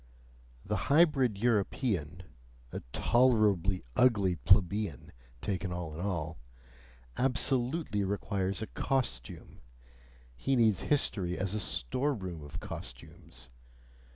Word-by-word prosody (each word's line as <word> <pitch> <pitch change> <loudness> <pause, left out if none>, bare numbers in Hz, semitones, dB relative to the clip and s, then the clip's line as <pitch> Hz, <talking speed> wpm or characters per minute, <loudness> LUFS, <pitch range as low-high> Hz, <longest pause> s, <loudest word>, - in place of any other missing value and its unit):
The 105 - -1
hybrid 140 - +4
European 100 - 0 0.5
a - - -4
tolerably 105 - +3
ugly 100 -8 +4
plebeian, 95 +5 +2 0.3
taken 95 -2 -2
all 85 -3 -4
in 75 - -7
all 80 -5 -3 0.8
absolutely 125 -2 +1
requires 100 0 -2
a - - -5
costume: 115 - -3 0.7
he 135 - 0
needs 110 -6 +4
history 95 -11 0
as 95 +1 -1
a 105 - -1
storeroom 95 - -2
of 75 0 -7
costumes. - - -9
100 Hz, 95 wpm, -31 LUFS, 90-125 Hz, 0.8 s, hybrid